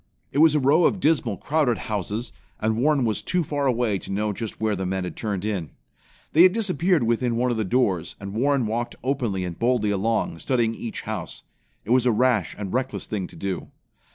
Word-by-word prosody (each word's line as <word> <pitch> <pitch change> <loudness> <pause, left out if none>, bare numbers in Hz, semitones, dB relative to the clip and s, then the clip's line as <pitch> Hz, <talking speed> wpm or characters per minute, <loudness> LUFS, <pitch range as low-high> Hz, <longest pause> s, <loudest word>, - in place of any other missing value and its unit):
It 140 - 0
was 155 -1 +6
a - - +4
row 145 +6 +4
of 195 - +2
dismal, 145 - +1
crowded 145 -7 +1
houses, 105 +3 -4 0.3
and 110 0 +1
Warren 140 +2 +2
was 110 -2 0
too 180 -1 0
far 145 -2 -1
away 120 -5 +1
to - - -9
know 105 +2 0
just 110 +1 -6
where 110 -1 +1
the 95 - -3
men 95 0 -1
had 90 - -5
turned 105 -3 -3
in. 95 -8 -2 0.6
They 160 - +6
had 185 0 +7
disappeared 180 - +1
within 120 +1 +1
one 125 +1 +1
of 120 - -1
the 110 - 0
doors, 100 -5 0
and 100 0 -7
Warren 135 +2 +2
walked 115 +2 -2
openly 120 -8 -1
and 85 -2 -6
boldly 115 -3 +2
along, 100 -4 0
studying 120 -1 +1
each 115 0 -5
house. 105 -6 -5 0.4
It 110 - -3
was 125 0 +4
a - - +5
rash 115 -4 +1
and 100 -2 -5
reckless 130 +1 -2
thing 100 -4 -3
to - - -15
do. 95 +2 -4
115 Hz, 210 wpm, -24 LUFS, 105-130 Hz, 0.6 s, had